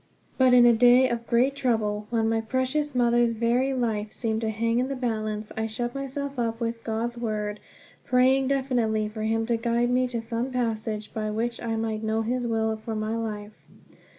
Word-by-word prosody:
But 255 -1 +5
in 245 -1 +7
a 240 - +7
day 245 +3 +6
of 235 -1 -3
great 255 +3 +2
trouble, 220 -6 -1
when 225 -2 +1
my 225 0 +1
precious 260 +5 -1
mother's 240 -1 +3
very 240 +4 +1
life 220 -5 -1
seemed 220 -1 -2
to 220 - -1
hang 230 +2 0
in 255 - 0
the 275 - -3
balance, 215 -4 -3
I 220 0 -1
shut 240 +2 -3
myself 275 0 -4
up 230 -1 -1
with 230 -1 -3
God's 235 +2 -3
Word, 210 -2 -3 0.4
praying 260 +1 +3
definitely 245 -6 0
for 215 0 -7
him 225 +1 0
to 235 0 +1
guide 235 +1 0
me 255 0 +2
to 240 -2 -3
some 230 +2 -3
passage 220 -3 -2
by 215 -1 -2
which 230 +2 -2
I 230 -1 -2
might 220 -1 -2
know 220 0 0
his 245 +2 -1
will 220 -1 0
for 220 +1 -5
my 215 +1 -2
life. 215 -2 -5
230 Hz, 195 wpm, -26 LUFS, 220-250 Hz, 0.4 s, in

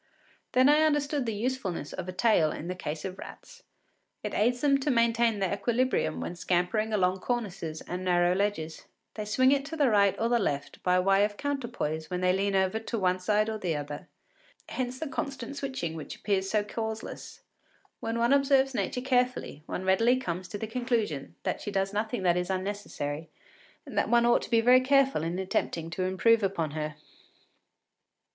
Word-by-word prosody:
Then 255 +1 +5
I 295 +1 +6
understood 295 -3 +1
the 225 - -1
usefulness 215 - -3
of 180 - -5
a - - -2
tail 185 -6 +3
in 165 - -6
the - - -1
case 155 -3 -5
of 190 0 -6
rats: - - -11 0.6
it - - -4
aids 245 +3 +1
them 275 -2 +4
to 275 - -1
maintain 230 -2 +3
their 195 -1 0
equilibrium 230 - 0
when 170 - -4
scampering 180 +5 0
along 190 -3 +1
cornices 190 -9 -3
and 180 +1 -5
narrow 175 -1 +3
ledges. 185 -5 -2 0.3
They 215 - -5
swing 255 +5 +3
it 280 -1 +2
to 320 +3 -6
the 280 -5 +3
right 200 -2 +4
or 230 - +1
the 240 0 +2
left 145 -8 -3
by 180 0 +3
way 195 +2 +4
of 205 0 -1
counterpoise 235 - -3
when 180 0 -2
they 180 0 +3
lean 195 +1 0
over 190 +3 +2
to 225 +1 -4
the - - -1
one 185 -1 +1
side 210 +3 +2
or 220 -1 -3
the 175 -5 -1
other; 145 0 -6 0.6
hence 255 0 -3
the 315 - -4
constant 275 -1 -5
switching 260 - -3
which 160 -2 -7
appears 195 -2 -1
so 210 +1 +2
causeless. 220 +1 -6 0.6
When 225 +1 -3
one 235 +3 +3
observes 275 -1 +3
Nature 230 +2 -2
carefully, 250 - 0
one 185 - -4
readily 225 +7 +4
comes 180 -7 -4
to 205 - -5
the 220 - -4
conclusion 225 - -2
that - - -2
she - - -4
does 195 0 -1
nothing 215 0 -2
that 175 -1 +3
is 180 0 -2
unnecessary, 185 -6 -3 0.6
and - - -9
that - - 0
one 235 0 +4
ought 240 - +4
to - - -7
be 230 -1 +4
very 250 +2 +6
careful 270 - +3
in 165 +2 -2
attempting 170 -3 -2
to 185 +2 -2
improve 225 +5 +3
upon 180 -6 -1
her. 155 0 -4
205 Hz, 195 wpm, -28 LUFS, 180-245 Hz, 0.6 s, I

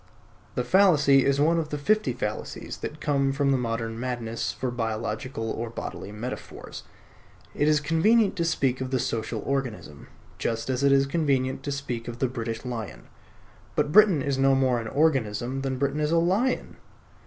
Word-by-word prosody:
The 125 - 0
fallacy 145 -4 +5
is 140 0 +2
one 165 +3 +3
of 155 -2 -3
the 150 - -3
fifty 210 0 +1
fallacies 110 -3 -5
that 150 - -6
come 140 -2 +1
from 140 0 +1
the 135 - +3
modern 115 -1 -3
madness 120 -2 -3
for 130 -1 -3
biological 115 0 -3
or 115 +1 -4
bodily 105 -3 -6
metaphors. 115 +5 -7 0.7
It 145 - +1
is 155 -1 +4
convenient 195 +9 +3
to 170 - +1
speak 135 -6 0
of 130 - -3
the 130 - +1
Social 110 -2 -2
Organism, 125 - -4 0.3
just 115 +2 -2
as 130 +1 -1
it 140 - +5
is 135 0 +5
convenient 135 -4 0
to 145 - -4
speak 125 -5 -4
of 120 -1 -6
the 130 - +1
British 115 -1 -5
Lion. 115 -4 -6 0.7
But 145 - +1
Britain 195 -7 +6
is 140 -1 -1
no 135 0 +4
more 130 -2 +2
an 115 - -5
organism 130 -3 0
than 135 -1 -2
Britain 140 +2 -1
is 150 0 +1
a 170 - +3
lion. 195 +10 +1
135 Hz, 175 wpm, -26 LUFS, 120-150 Hz, 0.7 s, Britain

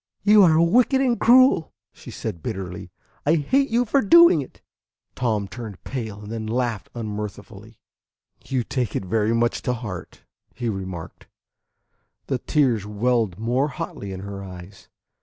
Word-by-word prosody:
"You 210 +1 +6
are 160 -4 +5
wicked 240 +10 +4
and 250 -3 +1
cruel!" 255 -7 +5 0.2
she - - -13
said 95 -7 -6
bitterly. 95 +2 -6 0.3
"I 155 +3 +3
hate 265 - +1
you 240 +2 +2
for 275 +5 +2
doing 300 - +7
it." 130 - -12 0.5
Tom 110 -5 -1
turned 110 -4 -9
pale, 110 -6 -6
and 105 - -9
then 110 -1 -4
laughed 120 -2 -2
unmirthfully. 105 -1 -7 0.7
"You 130 -2 -1
take 125 -1 -3
it - - -2
very 110 +4 +1
much 120 0 0
to 125 - -1
heart," 105 -8 -7 0.3
he 120 -2 -3
remarked. 95 -5 -7 1.0
The 130 -2 -2
tears 125 -7 +1
welled 105 -2 0
more 120 +6 0
hotly 100 -7 -6
in 95 0 -6
her 100 0 -7
eyes. 90 0 -12
115 Hz, 150 wpm, -23 LUFS, 100-145 Hz, 1.0 s, doing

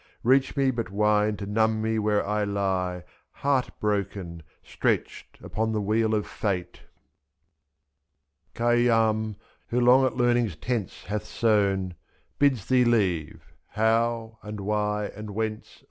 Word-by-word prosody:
2/^. - - -31 0.2
Reach 130 +4 +3
me 135 -1 +3
but 115 -4 -4
wine 105 +1 +2
to 100 - -5
numb 110 +2 +1
me 110 0 0
where 105 -1 +1
I 105 +1 0
lie 95 -3 -1 0.3
Heart 140 -2 0
broken, 100 -5 -2 0.2
stretched - - -2
upon 110 +1 -2
the 110 - 0
wheel 110 +2 +1
of 105 - -1
Fate. 90 -4 -3 1.8
86 - - -15
Khayyam, 115 -2 +2 0.3
who 120 - 0
long 125 +2 +6
at 125 - -5
learning's 120 -6 +2
tents 115 +2 -4
hath 105 +2 -3
sewn. 100 -5 +1 0.5
Bids 130 -7 +2
thee 125 0 +4
leave 95 -10 0 0.2
How? 115 +1 0
and 105 -1 -7
Why? 105 +1 -1
and 105 -1 -8
Whence? 110 -1 -4
110 Hz, 135 wpm, -26 LUFS, 100-115 Hz, 1.8 s, long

